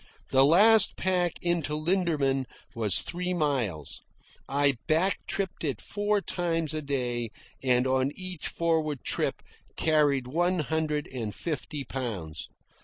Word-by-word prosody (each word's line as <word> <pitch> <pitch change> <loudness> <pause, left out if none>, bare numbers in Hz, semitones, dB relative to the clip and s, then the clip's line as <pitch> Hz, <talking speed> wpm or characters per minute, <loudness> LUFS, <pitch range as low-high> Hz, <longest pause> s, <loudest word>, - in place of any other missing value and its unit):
The 135 0 +6
last 205 +8 +6
pack 180 -2 +1
into 170 -4 0
Linderman 155 -6 +1 0.3
was 110 -5 +1
three 180 +1 -3
miles. 125 - -1 0.5
I 140 -1 +3
back 170 +5 +2
tripped 195 -3 -2
it 135 -9 -1
four 205 0 0
times 165 -4 -1
a 155 - -2
day, 125 -5 -2 0.3
and 125 -1 +3
on 130 0 +2
each 185 -3 -5
forward 160 -4 0
trip - - -1 0.3
carried 145 -4 +3
one 175 +7 +1
hundred 155 -1 -1
and 115 -5 -4
fifty 150 -2 -4
pounds. 100 - -5
150 Hz, 125 wpm, -28 LUFS, 130-175 Hz, 0.5 s, The